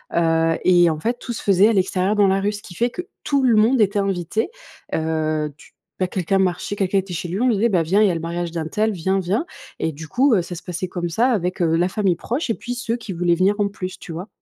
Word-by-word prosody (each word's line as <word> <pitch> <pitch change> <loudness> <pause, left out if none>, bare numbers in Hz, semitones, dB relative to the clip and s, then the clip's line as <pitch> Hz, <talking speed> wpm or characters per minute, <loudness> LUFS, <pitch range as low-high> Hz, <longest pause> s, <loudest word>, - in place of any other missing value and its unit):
heu, 165 -1 +2
et 175 -2 +6
en 155 -1 -2
fait 240 +6 -2
tout 240 - -5
se - - -7
faisait 200 +1 +5
à 230 - +2
l'extérieur 190 +1 +1
dans 205 -1 +4
la 195 +1 +2
rue, 205 +1 +1
ce 205 - -8
qui 175 - -11
fait 240 +6 +1
que 360 - -6 0.2
tout 280 -2 +1
le 240 -3 +4
monde 235 +4 +4
était 205 0 +2
invité. 195 +2 -1 0.5
Heu, 155 -1 -1
tu - - -18 0.3
bah, 185 - +2
quelqu'un 185 +1 0
marchait, 185 +2 0
quelqu'un 195 -1 +1
était 185 -1 -6
chez 175 - -4
lui, 190 +7 -3
on 255 - +3
lui 240 - +3
disait: 225 +4 +2
«Bah, 180 -5 +2
viens, 195 +6 +2
il - - +5
y - - +2
a 170 - -2
le - - -2
mariage 170 0 -3
d'untel, 175 +7 -1
viens, 190 +1 0
viens!» 195 - -1 0.3
Et 160 - 0
du 155 +2 -9
coup, 255 - +3
heu, 180 - +2
ça 175 - -7
se 170 - -8
passait 180 +1 -4
comme 175 -1 -3
ça 235 +10 +2
avec, 185 -5 -1
heu, 165 -1 +2
la 175 +2 +2
famille 190 -3 +1
proche 245 - -3
et - - -1
puis 245 0 -5
ceux 240 -1 -2
qui 215 -5 -7
voulaient 175 0 +1
venir 190 +4 +2
en 205 - +2
plus, 185 -2 -6
tu - - -9
vois? 180 +6 -6
190 Hz, 280 wpm, -21 LUFS, 170-215 Hz, 0.5 s, et